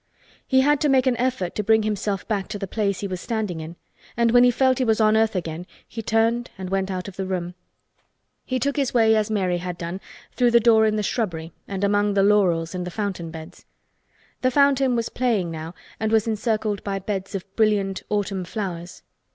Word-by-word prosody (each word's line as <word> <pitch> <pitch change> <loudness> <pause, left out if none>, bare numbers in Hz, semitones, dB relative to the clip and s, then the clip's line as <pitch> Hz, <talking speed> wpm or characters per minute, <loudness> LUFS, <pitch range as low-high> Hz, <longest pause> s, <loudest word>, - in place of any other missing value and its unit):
He 260 -1 +4
had 290 +1 +3
to 300 - +2
make 265 -1 +4
an 255 -2 +2
effort 245 -8 -1
to 210 - -2
bring 220 +1 +4
himself 205 -2 -2
back 205 -4 -1
to 215 - -5
the 200 - -4
place 200 -1 -1
he 200 - -2
was 185 -1 -5
standing 215 -8 -3
in 160 +2 -8 0.4
and 235 -1 +3
when 245 +1 +6
he 250 - +6
felt 260 +1 +2
he - - +2
was 225 -2 +2
on 215 0 +4
earth 220 -1 +2
again 170 0 -4 0.2
he 225 - -6
turned 225 +2 +1
and 190 -1 -6
went 195 0 0
out 185 0 -4
of 195 - -10
the 190 - -2
room. 180 -2 -3 0.9
He 255 - -2
took 280 +4 -1
his 275 -3 0
way, 220 -2 +5
as 215 0 +1
Mary 185 -5 0
had 180 0 -5
done, 175 +3 -5 0.3
through 245 -2 +2
the 235 0 +5
door 220 -1 +5
in 215 - +1
the 210 - -1
shrubbery 170 -8 -2
and 195 0 -4
among 205 0 +2
the 195 - +4
laurels 185 -5 +2
and 180 -1 -3
the 180 - -4
fountain 185 -4 -4
beds. 160 +2 -11 0.7
The 255 - +3
fountain 275 -1 +3
was 230 -1 -1
playing 220 -9 0
now 160 +2 -7 0.2
and 220 0 -1
was 220 -1 +3
encircled 215 -2 -1
by 200 -1 -2
beds 195 +1 -4
of 190 - -4
brilliant 205 -3 +1
autumn 200 -2 -1
flowers. 180 -3 -6
210 Hz, 215 wpm, -23 LUFS, 185-230 Hz, 0.9 s, when